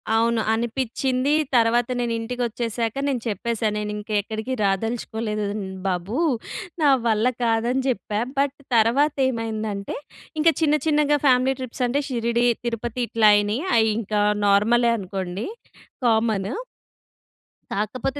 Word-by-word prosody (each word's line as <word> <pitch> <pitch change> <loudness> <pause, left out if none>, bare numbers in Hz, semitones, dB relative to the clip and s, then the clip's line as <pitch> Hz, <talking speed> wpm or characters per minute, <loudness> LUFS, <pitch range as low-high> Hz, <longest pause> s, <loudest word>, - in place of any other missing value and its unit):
అవును. 230 0 +2
అనిపిచింది. 255 +3 0 0.2
తర్వాత 235 0 +3
నేను 240 -1 -1
ఇంటికొచ్చేసాక 230 -1 -2
నేను 260 -4 -1
చెప్పేసా. 225 +1 -1
నేను 210 0 -3
ఇంకా 210 +1 -6
ఎక్కడికి 220 +4 -4
రాదలుచుకోలేదు. 215 +1 -1
హ్మ్. 190 -2 -5
బాబు. 185 +5 -2 0.7
నా 290 - +6 0.2
వల్ల 220 0 +2 0.2
కాదని 235 +3 +1
చెప్పా. 210 -3 -2 0.2
బట్ 280 0 +1 0.2
తర్వాత 250 +7 +3
ఏమైందంటే 220 -4 -3 0.4
ఇంకా 330 +2 +5
చిన్న 300 -1 +4
చిన్నగా 295 -1 +3
ఫ్యామిలీ 255 0 +4
ట్రిప్స్ 255 0 -4
అంటే 275 +4 0
షిరిడీ 235 -1 0 0.2
తిరుపతి 235 +1 -3
ఇట్లా 220 -2 +4
అయినాయి. 205 +5 +1 0.2
అయి 220 0 +4
ఇంకా 210 -1 -1 0.2
నార్మలే 230 +4 +4
అనుకోండి. 190 0 -4 0.6
కామన్. 220 -3 +2 1.2
కాకపోతే 250 +7 -2
230 Hz, 120 wpm, -23 LUFS, 215-250 Hz, 1.2 s, నా